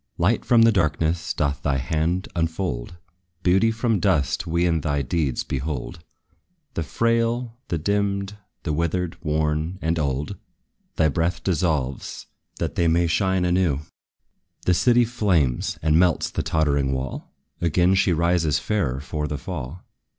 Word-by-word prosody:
Light 100 +7 +2
from 120 -2 +5
the 115 - +6
darkness 80 -3 0
doth 70 -2 -1
thy 70 -2 0
hand 80 +7 -1
unfold: 80 -4 -2 0.5
Beauty 95 +5 +4
from 115 -1 0
dust 85 -2 +1
we 85 +1 +1
in 80 -2 +1
thy 70 -1 0
deeds 70 0 -1
behold: 70 +2 -4 0.7
The - - -2
frail, 115 +5 0
the 85 - -1
dimmed, 100 +3 -1 0.3
the 80 - -1
withered, 85 +2 -1
worn 75 +3 0
and 85 -1 0
old 75 +6 -2 0.6
Thy 80 - +3
breath 85 +3 -1
dissolves, 80 -7 -1 0.3
that - - -3
they 85 - +1
may 85 +1 +3
shine 95 +2 +1
anew. 90 -5 +1 0.8
The 90 - +4
city 120 +6 +4
flames, 95 - +1
and 80 0 +4
melts 90 -2 +2
the - - -1
tottering 70 -4 +1
wall; 65 0 -5 0.3
Again 85 +2 +3
she 95 -1 +3
rises 85 -3 +2
fairer 75 -10 -1
for 75 +1 -3
the 75 - -3
fall. 70 +9 -6
85 Hz, 145 wpm, -23 LUFS, 75-95 Hz, 0.8 s, the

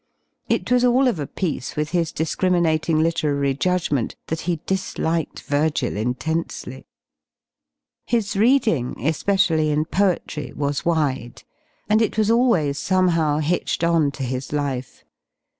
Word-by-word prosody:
It - - 0
was 250 0 +4
all 250 +2 +4
of 225 -10 0
a 145 - -3
piece 155 -8 -3
with 150 +1 -2
his 170 -2 0
discriminating 160 -1 +1
literary 145 -4 0
judgment 150 -4 0
that 160 0 -2
he 170 -2 0
disliked 170 -4 -2
Firgil 145 +1 0
intensely. 130 +9 -3 1.2
His 220 -4 0
reading, 215 - +2
especially 165 -1 +2
in 150 +1 +1
poetry, 175 -4 -1
was 145 0 -2
wide, 140 -8 -1 0.4
and 215 +2 +3
it 220 - 0
was 215 0 +3
always 205 - +2
somehow 170 -5 +2
hitched 155 +3 -1
on 165 -3 +3
to 135 - -5
his 130 +1 -4
life. 140 -4 -3
160 Hz, 125 wpm, -22 LUFS, 145-185 Hz, 1.2 s, was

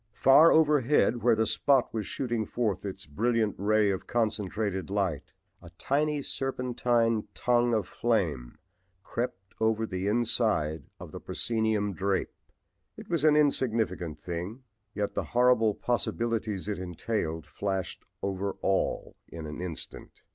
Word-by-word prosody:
Far 145 +5 +7
overhead 145 -6 +3
where 120 -1 +4
the 110 0 +1
"spot" 135 +4 +2
was 110 -3 -3
shooting 120 -5 -2
forth 110 -5 -2
its 95 0 -7
brilliant 110 +7 0
ray 105 0 +3
of 95 - -4
concentrated 105 -4 -1
light 95 -7 -2 0.3
a 85 - -12
tiny 150 +1 0
serpentine 120 -4 0
tongue 120 -1 +2
of 110 - -1
flame 80 - -1 0.5
crept 95 -6 -5
over 110 0 +1
the 95 -2 -3
inside 105 - +1
of - - -9
the - - -7
proscenium 110 -3 0
drape. 95 +1 -1 0.6
It - - -10
was 165 -4 +1
an 155 -1 +5
insignificant 115 - +1
thing, 90 +8 -5 0.3
yet 105 -1 -2
the - - -1
horrible 120 -4 +4
possibilities 115 -4 -1
it 105 -3 -3
entailed 90 -2 -3
flashed 95 0 -4 0.2
over 100 0 -2
all 95 0 0
in 80 -1 -8
an 75 +2 -6
instant. 90 -3 -7
110 Hz, 135 wpm, -28 LUFS, 95-120 Hz, 0.6 s, Far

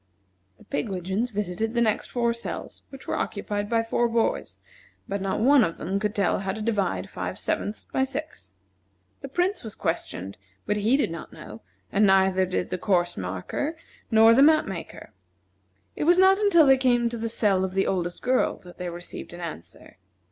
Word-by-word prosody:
The - - -18
pigwidgeons 190 +7 -2
visited 210 +2 -3
the - - +2
next 215 -3 +1
four 235 -1 0
cells, 235 - -7
which 270 -1 -12
were - - -3
occupied 205 0 -3
by 230 -1 +2
four 235 +1 0
boys, 230 0 -1 0.5
but 200 0 -3
not 195 0 -1
one 270 +1 +6
of 165 - -2
them 195 +2 -2
could 210 0 -2
tell 195 -4 +1
how 190 0 -2
to 220 - -6
divide 210 -5 -1
five - - -5
sevenths 210 - -3
by 265 - 0
six. 290 +4 -6 0.7
The 275 - -6
Prince 360 +8 -1
was 220 -3 -6
questioned, 100 - -4 0.3
but 210 - 0
he 220 +6 +3
did 280 - 0
not 165 -1 -7
know; 105 +2 -11 0.3
and 205 +1 +4
neither 190 -1 +3
did 185 0 -2
the 180 - -2
course 175 -3 +1
marker, 95 - -4 0.3
nor 225 +1 +7
the 260 - +5
map 310 +2 +6
maker. 190 -4 -8 0.8
It - - -2
was 350 +2 +5
not 380 +1 +6
until 375 -7 +5
they 270 -1 +6
came 245 -2 +2
to 235 - -5
the 230 0 -2
cell 200 -4 +2
of 190 0 -3
the 195 - +2
oldest 175 -2 -2
girl 255 0 +1
that 180 0 -14
they 180 -1 -3
received 175 0 -8
an 175 - -9
answer. 95 - -9
210 Hz, 190 wpm, -25 LUFS, 185-245 Hz, 0.8 s, nor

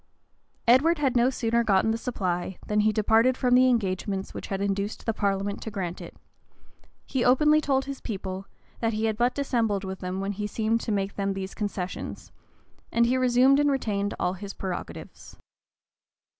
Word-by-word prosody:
Edward 290 +8 +5
had 275 -4 0
no 240 +1 +4
sooner 235 -2 0
gotten 210 0 +3
the - - 0
supply, 185 -6 -2
than 210 0 0
he 215 +1 +3
departed 225 +4 +3
from 250 -2 +2
the 255 +1 +6
engagements 195 -4 -1
which - - -7
had 195 - -3
induced 200 +1 -2
the 225 - 0
parliament 200 -1 -1
to - - -5
grant 185 -4 -4
it; - - -10 0.9
he 260 -3 -1
openly 300 +4 +5
told 270 -2 +1
his 275 -1 -6
people, 190 -3 -5 0.3
that 225 -1 0
he 215 +1 -1
had 220 -1 0
but 240 +3 +1
dissembled 230 -8 0
with 190 -1 -5
them 185 +1 -4
when 195 +1 -2
he 205 +1 -3
seemed 225 +2 0
to 225 - -3
make 200 -1 -2
them 195 -1 0
these 195 0 -5
concessions; 200 -4 -5 0.6
and 235 0 +3
he 245 +2 +2
resumed 255 +2 +4
and 290 0 +3
retained 205 -7 -1
all 180 - 0
his 200 +1 -8
prerogatives. 185 -2 -7
215 Hz, 180 wpm, -26 LUFS, 195-250 Hz, 0.9 s, the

